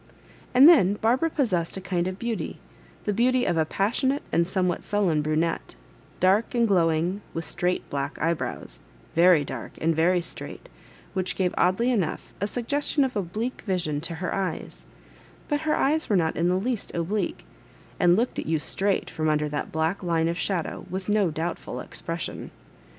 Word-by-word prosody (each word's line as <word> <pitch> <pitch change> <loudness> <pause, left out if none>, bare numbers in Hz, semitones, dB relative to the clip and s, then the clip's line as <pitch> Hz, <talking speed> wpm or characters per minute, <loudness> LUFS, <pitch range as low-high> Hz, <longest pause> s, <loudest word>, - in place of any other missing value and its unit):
And 265 +4 +9
then 205 - +6
Barbara 245 +10 +2
possessed 195 - 0
a - - -3
kind 180 -2 -1
of 185 0 -4
beauty, 230 0 -3 0.5
the 210 - 0
beauty 250 +3 +2
of 175 - +1
a 160 -1 +2
passionate 255 - 0
and 170 0 +2
somewhat 180 -2 0
sullen 190 -7 +1
brunette, 155 - -1 0.4
dark 195 +7 +3
and 235 -1 +3
glowuig, 175 0 +2 0.2
with 165 0 -2
straight 180 +1 -1
black 140 0 -3
eyebrows, 155 - -2 0.3
very 170 -2 +6
dark - - -6
and 165 0 +1
very 175 +3 +3
straight, 180 - -7 0.4
which 185 -1 -2
gave 185 -2 0
oddly 190 +8 +2
enough 195 -10 -2
a 200 - +1
suggestion 280 +5 0
of 260 -1 -1
obUque 215 +5 -3
vision 170 -7 -1
to 165 +1 -5
her 180 +1 -3
eyes; 195 -2 -4 0.6
but 295 -1 0
her - - +4
eyes 310 +4 +1
were 205 - +3
not 160 -2 +1
in 170 - +1
the 180 - +2
least 225 +4 -2
oblique, 180 +5 -2 0.5
and 175 -2 +5
looked 235 +5 0
at - - -4
you 160 0 +2
straight 195 +6 -1
fix>m 155 0 +1
under 150 0 +1
that 150 0 -4
black 160 +4 0
line 165 -3 +1
of 170 - -1
shadow 180 -2 -2
with 190 +2 -4
no 205 -3 +3
doubtful 165 +2 -4
expression. 165 -1 -5
185 Hz, 170 wpm, -26 LUFS, 165-215 Hz, 0.6 s, And